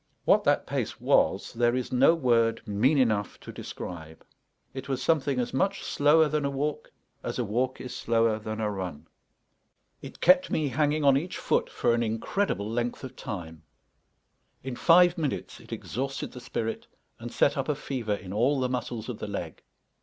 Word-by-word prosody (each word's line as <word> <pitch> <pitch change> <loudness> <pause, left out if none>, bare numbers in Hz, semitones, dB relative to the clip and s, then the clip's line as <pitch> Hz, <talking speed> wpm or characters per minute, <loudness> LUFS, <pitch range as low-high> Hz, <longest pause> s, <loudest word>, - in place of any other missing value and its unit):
What - - +5
that - - +3
pace - - -3
was - - +2
there 120 +1 +2
is 130 -1 -3
no 130 +6 +5
word 115 -5 +1
mean 115 +9 +2
enough 110 -6 +1
to - - -9
describe; 80 -2 -8 0.5
it 135 +1 -7
was 135 - -1
something 140 -5 +1
as 120 - -2
much 195 +9 0
slower 150 +2 +4
than 150 0 -1
a 140 - 0
walk 145 +2 -3 0.3
as - - -4
a - - 0
walk 125 +5 -1
is 125 0 -7
slower 115 -2 +1
than 110 0 -5
a 105 -1 0
run; 90 -6 -5 1.0
it - - -10
kept 275 0 +5
me 150 -3 0
hanging 150 +3 +1
on 140 -1 +6
each 175 +6 -4
foot - - 0
for 120 - +1
an 120 - +1
incredible 115 - -1
length 120 +3 -2
of 130 - -8
time; 80 -5 -7 1.0
in 130 -1 -4
five 175 +4 +5
minutes 150 -4 -3
it - - -16
exhausted 135 +2 -4
the 125 - -10
spirit 115 -1 -4 0.3
and 120 +1 -7
set 145 - +2
up 135 +1 -2
a 150 - +1
fever 125 -7 -3
in 95 -1 -8
all 130 +7 +2
the 130 -1 0
muscles 120 -3 -4
of 125 -4 -5
the - - -5
leg. 90 -6 -5
125 Hz, 185 wpm, -27 LUFS, 110-145 Hz, 1.0 s, on